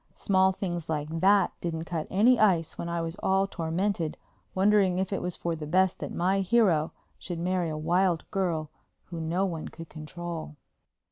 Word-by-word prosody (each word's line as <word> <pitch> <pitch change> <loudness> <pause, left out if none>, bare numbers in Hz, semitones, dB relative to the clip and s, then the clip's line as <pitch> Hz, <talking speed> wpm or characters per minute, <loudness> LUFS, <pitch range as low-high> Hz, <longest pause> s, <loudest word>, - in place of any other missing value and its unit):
Small 190 -1 +3
things 175 -4 -4
like 155 +1 -2
that 195 +1 +4
didn't 165 -2 -3
cut 165 -2 -4
any 230 +6 +4
ice 180 -7 +3
when 170 - -5
I 170 0 -1
was 165 +1 -4
all 195 0 +2
tormented 170 -1 -2 0.4
wondering 195 -1 +3
if 190 +1 -1
it - - -1
was 180 -1 -3
for 170 -1 -2
the 155 -2 -6
best 185 +3 +2
that - - -5
my 190 +3 +1
hero 190 -6 +3 0.3
should 175 -2 -5
marry 180 0 0
a 155 - -3
wild 175 +2 +1
girl 165 -6 -1 0.4
who 165 -1 -4
no 170 +4 0
one 165 -4 -4
could 165 -1 -10
control. 160 0 -7
175 Hz, 180 wpm, -28 LUFS, 165-190 Hz, 0.4 s, that